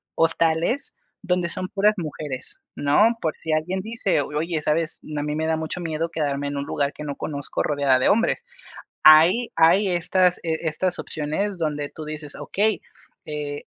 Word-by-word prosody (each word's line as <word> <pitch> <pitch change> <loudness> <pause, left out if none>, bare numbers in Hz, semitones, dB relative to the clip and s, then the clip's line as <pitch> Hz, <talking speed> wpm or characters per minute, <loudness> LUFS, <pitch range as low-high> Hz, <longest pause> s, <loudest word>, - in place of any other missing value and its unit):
hostales 165 - +1 0.3
donde 180 -2 0
son 185 +1 -4
puras 210 +2 +2
mujeres, 150 -5 -5
¿no?, 210 +12 +3
por 160 -2 -1
si 160 - -3
alguien 175 +5 0
dice: 215 -7 0
"Oye, 155 +3 -2
¿sabes?, 155 +2 -1 0.2
A 145 - -1
mí 150 0 -2
me 160 +1 -1
da 160 0 +1
mucho 160 +3 -4
miedo 165 0 -2
quedarme 145 -3 -2
en 140 0 -3
un 140 - -2
lugar 140 0 -1
que - - -8
no 145 -2 -4
conozco 145 -1 -3
rodeada 140 -3 +2
de - - +2
hombres". 230 - +2 0.6
Hay 165 +10 +7
hay 175 +5 +5
estas 180 +1 +2
estas 165 +2 -1
opciones 170 +6 -3
donde 150 -2 -2
tú 155 - -9
dices: 150 -1 -7
"Okey, 215 +1 0 0.4
eh, 145 -1 -5
160 Hz, 165 wpm, -23 LUFS, 150-180 Hz, 0.6 s, Hay